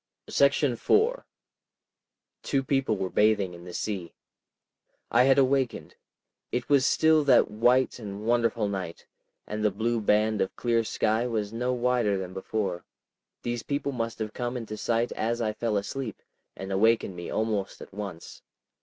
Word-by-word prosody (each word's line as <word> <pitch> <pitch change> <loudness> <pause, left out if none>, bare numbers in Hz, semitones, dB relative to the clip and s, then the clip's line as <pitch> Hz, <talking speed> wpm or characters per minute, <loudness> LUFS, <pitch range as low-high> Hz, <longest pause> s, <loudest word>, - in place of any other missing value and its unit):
§ 140 -2 +3
4 480 +4 +2 1.2
Two 135 -1 0
people 135 -5 0
were 95 -1 -3
bathing 105 -4 +2
in 85 0 -11
the 90 - -8
sea. 95 -6 -4 1.0
I 120 +2 +5
had 135 0 +5
awakened. 135 -2 +1 0.6
It 125 0 -2
was 140 -3 +4
still 160 -1 +4
that 130 -6 +5
white 125 +5 +2
and 105 -1 -7
wonderful 115 -2 +1
night, 95 -4 -5 0.4
and 105 0 -4
the 105 - +4
blue 115 +3 -1
band 105 +1 +2
of 95 - -1
clear 115 -1 +1
sky 110 +2 0
was 110 -3 -2
no 125 +2 -1
wider 120 -4 +1
than 95 -1 -5
before. 95 -2 -3 0.6
These 120 -1 -2
people 140 +2 -2
must 115 -3 -3
have 110 -1 -4
come 120 0 -3
into 110 -3 -6
sight 115 +2 0
as 115 +2 -1
I 110 -2 -1
fell 110 -1 -1
asleep, 110 +3 -5 0.3
and 95 0 -6
awakened 105 -1 +2
me 85 0 -6
almost 110 -3 -2
at - - -12
once. 100 -5 -7
115 Hz, 155 wpm, -27 LUFS, 105-125 Hz, 1.2 s, I